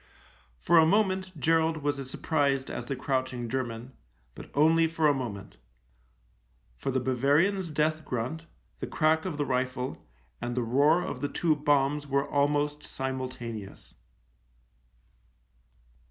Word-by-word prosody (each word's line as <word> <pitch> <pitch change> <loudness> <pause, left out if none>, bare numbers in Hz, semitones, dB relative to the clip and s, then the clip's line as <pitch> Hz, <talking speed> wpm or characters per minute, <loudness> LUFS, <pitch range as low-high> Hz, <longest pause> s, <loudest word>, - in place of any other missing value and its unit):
For 170 - +4
a 160 - +6
moment 190 -2 +1
Gerald 160 +1 +2
was 145 -1 0
as 135 -1 -6
surprised 140 -3 0
as 120 - -5
the 135 - -2
crouching 130 -2 -2
German, 120 0 -4 0.4
but - - -11
only 160 +3 +5
for 160 -1 +1
a 145 - +5
moment, 105 - -6 1.2
for - - -4
the 130 0 +1
Bavarian's 145 +9 +2
death 155 +1 0
grunt, 130 +6 -4 0.3
the - - -4
crack 160 +1 +2
of 175 -6 -3
the 145 - 0
rifle, 130 0 -2 0.4
and 120 0 -3
the 125 - +1
roar 145 +9 +3
of - - -5
the 145 - -1
two 160 +1 +1
bombs 145 0 +1
were 140 0 0
almost 145 +1 +1
simultaneous. 130 -6 -5
145 Hz, 135 wpm, -28 LUFS, 130-160 Hz, 1.2 s, a